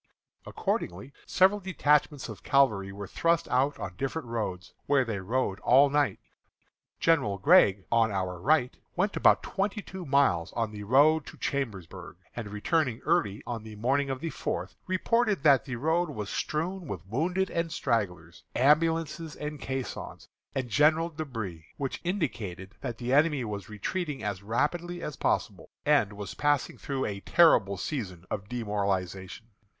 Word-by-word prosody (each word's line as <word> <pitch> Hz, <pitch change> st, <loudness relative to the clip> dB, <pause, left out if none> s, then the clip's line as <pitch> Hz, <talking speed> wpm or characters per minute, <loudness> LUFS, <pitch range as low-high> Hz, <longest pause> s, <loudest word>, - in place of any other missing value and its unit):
Accordingly, 100 Hz, +11 st, -3 dB
several 190 Hz, +3 st, +4 dB
detachments 150 Hz, -6 st, +1 dB
of 110 Hz, -3 st, -9 dB
cavalry 110 Hz, -9 st, +2 dB
were 100 Hz, +1 st, -7 dB
thrust 170 Hz, -, +1 dB
out 135 Hz, +3 st, +2 dB
on -, -, -6 dB
different 135 Hz, -1 st, -3 dB
roads, 95 Hz, -6 st, -4 dB
where 140 Hz, -2 st, +3 dB
they 110 Hz, -4 st, -3 dB
rode 100 Hz, 0 st, -1 dB
all 135 Hz, +3 st, +5 dB
night. 145 Hz, -2 st, +2 dB, 0.8 s
General 145 Hz, -12 st, +2 dB
Gregg, 105 Hz, -, +5 dB
on 115 Hz, -1 st, +4 dB
our 95 Hz, -2 st, -2 dB
right, 135 Hz, -, +2 dB, 0.2 s
went 195 Hz, +3 st, 0 dB
about -, -, +4 dB
twenty 205 Hz, +2 st, -2 dB
two 190 Hz, 0 st, -8 dB
miles 135 Hz, -, +2 dB
on 115 Hz, -2 st, -1 dB
the 105 Hz, -1 st, -7 dB
road 145 Hz, +8 st, +4 dB
to -, -, -10 dB
Chambersburg, 95 Hz, -10 st, -4 dB, 0.2 s
and 120 Hz, -3 st, -5 dB
returning 120 Hz, +4 st, 0 dB
early 100 Hz, 0 st, +1 dB
on 120 Hz, -2 st, -4 dB
the 110 Hz, 0 st, -10 dB
morning 135 Hz, +6 st, +1 dB
of 135 Hz, 0 st, -3 dB
the 165 Hz, -, -3 dB
fourth, -, -, -4 dB
reported 210 Hz, -, +1 dB
that 140 Hz, -6 st, +5 dB
the 130 Hz, -, -4 dB
road 160 Hz, +7 st, +1 dB
was 105 Hz, -8 st, -5 dB
strewn 170 Hz, +3 st, -2 dB
with 90 Hz, -7 st, -6 dB
wounded 175 Hz, -, -1 dB
and 165 Hz, -1 st, -1 dB
stragglers, 95 Hz, -, -2 dB
ambulances 160 Hz, +3 st, +2 dB
and 150 Hz, -1 st, -6 dB
caissons, 130 Hz, -1 st, -5 dB, 0.3 s
and 130 Hz, -2 st, -1 dB
general 155 Hz, +6 st, +3 dB
débris, 115 Hz, -, -5 dB
which 135 Hz, -2 st, -3 dB
indicated 115 Hz, -, -3 dB
that 120 Hz, -4 st, -4 dB
the 125 Hz, +2 st, -2 dB
enemy 145 Hz, -3 st, +3 dB
was 100 Hz, -3 st, -5 dB
retreating 145 Hz, -, -3 dB
as 100 Hz, -3 st, -3 dB
rapidly 165 Hz, -, -1 dB
as 150 Hz, -, -4 dB
possible, -, -, -1 dB, 0.2 s
and 145 Hz, -9 st, +3 dB
was 100 Hz, -2 st, -6 dB
passing 145 Hz, -2 st, +1 dB
through 135 Hz, -2 st, -3 dB
a 100 Hz, -1 st, -3 dB
terrible 100 Hz, -, +4 dB
season 90 Hz, -, -4 dB
of 100 Hz, -1 st, -4 dB
demoralization. 100 Hz, -4 st, -2 dB
130 Hz, 155 wpm, -28 LUFS, 105-155 Hz, 0.8 s, all